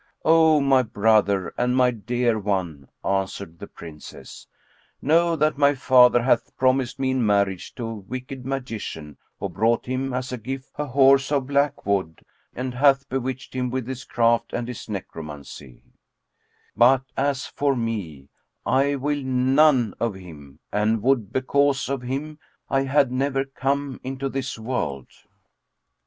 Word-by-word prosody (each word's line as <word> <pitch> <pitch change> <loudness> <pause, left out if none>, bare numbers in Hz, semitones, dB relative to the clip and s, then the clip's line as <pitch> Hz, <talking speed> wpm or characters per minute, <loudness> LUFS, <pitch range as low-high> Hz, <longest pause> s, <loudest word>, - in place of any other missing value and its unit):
"O 160 -1 +5
my 135 -2 +4
brother 105 -4 +2
and 125 +1 +1
my 125 -1 +4
dear 120 +1 -1
one," 90 -9 -3 0.2
answered 95 -3 -2
the - - -8
Princess, 80 -3 -12 0.5
"Know 165 +3 +3
that 155 -1 +1
my 140 0 +4
father 125 -2 +5
hath 130 - +1
promised 130 -1 +1
me 130 -1 0
in 130 -2 0
marriage 100 -3 0
to 120 - -5
a 115 - -4
wicked 125 +5 -7
magician 115 - -5 0.2
who - - -2
brought 110 +6 0
him, 130 +1 -2
as 125 0 -3
a 125 - -4
gift, 130 +3 -6
a 150 - -4
horse 135 +1 +4
of 140 -3 +1
black 140 +1 0
wood, 95 -5 -2 0.3
and 125 0 -4
hath 135 +1 +3
bewitched 130 0 -4
him 125 -1 -1
with 130 -1 -3
his 130 -1 -5
craft 115 0 +1
and 120 0 -3
his 125 -2 -7
egromancy; 75 - -8 0.9
but, 130 +2 +5
as 140 -2 0
for 140 -1 0
me, 100 - -4 0.4
I 140 +2 +2
will 145 +1 -2
none 130 -2 +3
of 115 -4 -1
him, 75 -7 -12
and 105 +1 +1
would, 125 -6 +1
because 140 +2 +1
of 135 -2 -2
him, 140 +5 -5 0.3
I 135 - +3
had 135 -1 +2
never 135 +1 0
come 135 0 -2
into 135 +1 -4
this 130 -2 -4
world!" 110 - -3
125 Hz, 150 wpm, -23 LUFS, 105-135 Hz, 0.9 s, O